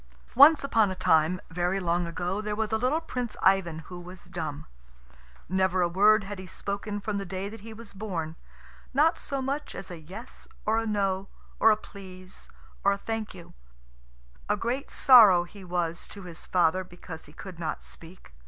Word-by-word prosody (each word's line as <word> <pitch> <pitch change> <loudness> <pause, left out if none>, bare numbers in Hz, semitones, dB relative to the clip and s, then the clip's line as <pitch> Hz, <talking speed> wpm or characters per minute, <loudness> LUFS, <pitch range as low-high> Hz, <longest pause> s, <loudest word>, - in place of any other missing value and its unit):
Once 290 +4 +8
upon 225 -7 +3
a 185 - -4
time, 170 0 +3
very 180 +3 0
long 175 -1 0
ago, 180 +4 -2
there 210 -1 -3
was 220 0 -2
a 220 - +2
little 255 +7 +2
Prince 250 -7 -4
Ivan 175 -4 +3
who 180 -1 -9
was 180 +1 -11
dumb. 160 -5 -5 0.8
Never 190 0 +2
a - - +3
word 205 +4 +5
had 200 0 -7
he 185 - -8
spoken 205 +2 -4
from 205 0 -2
the - - -3
day 190 +1 -4
that 225 +2 -10
he 225 +2 -10
was 230 +1 -11
born 175 -6 -4 0.6
not 310 +4 +4
so 275 -1 -3
much 280 +3 -3
as 195 - -7
a 175 - -7
"Yes" 190 +10 -10 0.2
or 220 +1 +2
a 225 - -3
"No," 195 -2 0 0.3
or - - +7
a 215 - +4
"Please" 185 -3 -11 0.3
or 200 - +4
a - - -3
"Thank 220 0 -4
you." 175 -2 -12 1.0
A - - +2
great 250 +4 -2
sorrow 215 -9 +7
he 195 +3 -13
was 175 -2 -2
to 200 - -10
his 175 -2 -8
father 180 +1 +2
because 175 -2 -10
he - - -14
could 185 0 -10
not 160 -2 -3
speak. 165 - -14
190 Hz, 190 wpm, -28 LUFS, 175-215 Hz, 1.0 s, Once